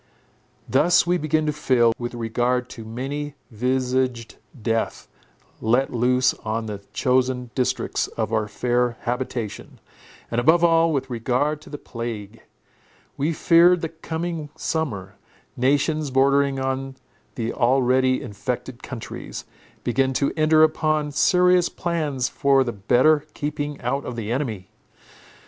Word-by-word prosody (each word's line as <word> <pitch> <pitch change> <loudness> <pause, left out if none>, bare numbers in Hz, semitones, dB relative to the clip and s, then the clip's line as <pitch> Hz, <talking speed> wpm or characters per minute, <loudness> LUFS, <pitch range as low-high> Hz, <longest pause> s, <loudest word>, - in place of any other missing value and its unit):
Thus 170 +8 +4
we 175 0 +1
began 155 +1 +1
to 150 - 0
feel, 125 -6 +3
with 120 0 -4
regard 120 +2 -1
to 115 - -8
many 140 +6 -5 0.2
visaged 125 0 -1 0.2
death 115 +1 -2 0.5
let 120 +5 +1
loose 125 +2 +3
on 110 +1 -2
the 105 -2 -6
chosen 125 -1 0
districts 130 -2 -1
of 115 - -3
our 110 -1 +1
fair 120 +2 0
habitation, 120 -3 -4 0.5
and 120 +1 +1
above 165 +6 +4
all, 165 -1 +4
with 135 -3 -2
regard 130 +6 0
to - - -14
the 145 - -6
plague. 115 -4 -7 0.7
We 150 +4 0
feared 170 +2 +5
the 165 - -2
coming 160 -1 -5
summer. 105 - -3 0.4
Nations, 145 +3 +1
bordering 140 +1 +3
on 135 0 -3 0.4
the 115 -1 -2
already 130 +1 +2
infected 125 +2 -5
countries, 125 -4 -7 0.4
began 135 +2 +1
to 140 +2 0
enter 155 0 +5
upon 155 -1 +1
serious 180 +3 +4
plans 150 -7 -2
for 140 -2 +3
the 120 -2 -3
better 130 +9 +3
keeping 145 -1 -3
out 140 0 -2
of 125 - -5
the 115 -1 -4
enemy. 115 -8 -3
130 Hz, 130 wpm, -23 LUFS, 120-150 Hz, 0.7 s, feared